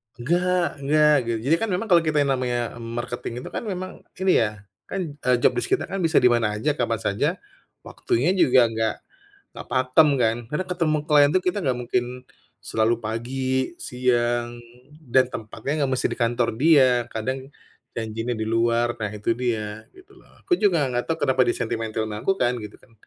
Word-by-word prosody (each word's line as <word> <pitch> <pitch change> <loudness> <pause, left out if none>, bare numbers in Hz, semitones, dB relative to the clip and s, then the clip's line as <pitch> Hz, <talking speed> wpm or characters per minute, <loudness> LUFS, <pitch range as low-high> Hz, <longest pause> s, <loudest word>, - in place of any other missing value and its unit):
Nggak 175 +7 +1 0.2
nggak, 150 +2 +4 0.2
gitu. 115 -1 -1
Jadi 155 - +4
kan 225 - 0
memang 220 +5 -2
kalau 175 - +7
kita 150 -2 +2
yang 140 - 0
namanya 120 -2 -2
marketing 120 +1 -5
itu - - -7
kan - - -4
memang 185 -1 -4 0.3
ini 190 0 +2
ya, 105 -2 -2 0.2
kan, 195 - -4 0.2
eee, 125 -2 +2
job - - +5
desc 370 - -2
kita 390 - +1
kan 195 - -5
bisa 165 -2 +2
di 125 - +7
mana 110 -3 +1
aja, 105 - 0
kapan - - -1
saja, - - +1 0.6
waktunya 140 +10 0
juga 130 -9 +5
nggak 110 0 -1 0.6
nggak - - -9
pakem, 130 +4 +4
kan. 115 0 +2
Karena 165 +5 -2
ketemu 165 -4 +1
klien 145 -2 +5
tuh 185 - +2
kita 185 +3 0
nggak 130 -4 0
mungkin 120 0 -1 0.6
selalu 110 +1 +1
pagi, 130 +6 -2
siang, 120 -1 -1 0.6
dan 130 -1 +5
tempatnya 130 +8 -4
nggak 130 - -3
mesti 130 - +1
di - - -5
kantor 120 0 +1
dia. 130 -5 +4
Kadang, 130 +4 -2 0.6
janji 115 0 -4
nih 120 -2 -2
di 110 - -2
luar. 115 +1 +1
Nah, 105 - -1
itu 105 +2 -1
dia 110 -3 -3
gitu, 375 - -18
lho. - - -20 0.2
Aku 385 - +1
juga 175 -9 +3
nggak 120 -1 -2
tahu 165 - 0
kenapa 130 -1 +2
dia 120 - 0
sentimentil 110 -1 -2
ama 105 0 -6
aku 195 0 0
kan 120 0 +1
gitu, 105 -1 -9
kan. 115 - -25
125 Hz, 190 wpm, -23 LUFS, 115-155 Hz, 0.6 s, kalau